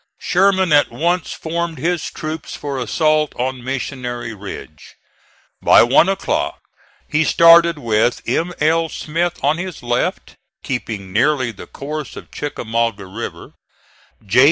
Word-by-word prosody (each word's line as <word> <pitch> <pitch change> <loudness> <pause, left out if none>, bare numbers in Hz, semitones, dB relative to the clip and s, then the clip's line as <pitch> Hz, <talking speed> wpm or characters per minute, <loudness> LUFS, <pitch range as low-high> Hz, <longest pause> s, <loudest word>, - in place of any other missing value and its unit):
Sherman 190 -2 +2
at 145 - +5
once 175 +2 -1
formed 165 0 -3
his 170 -1 -1
troops 155 -1 -6
for 140 -2 -4
assault 155 +4 +1
on 130 0 -3
Missionary 125 -3 -4
Ridge. 95 -7 -10 0.7
By - - +7
one 135 +9 +4
o'clock 195 - -1 0.5
he 150 +1 +2
started 170 0 +6
with 115 -2 +1
M. 165 +9 0
L. 165 +2 +2
Smith 170 +3 -2
on 155 +3 +2
his 185 -5 -6
left, 120 0 -2 0.3
keeping 105 -7 -4
nearly 130 +1 +2
the 105 - -11
course 150 +1 -6
of - - -11
Chickamauga 115 -7 -2
River; 105 +5 -7 0.7
J. 105 +5 +2
145 Hz, 130 wpm, -19 LUFS, 120-165 Hz, 0.7 s, By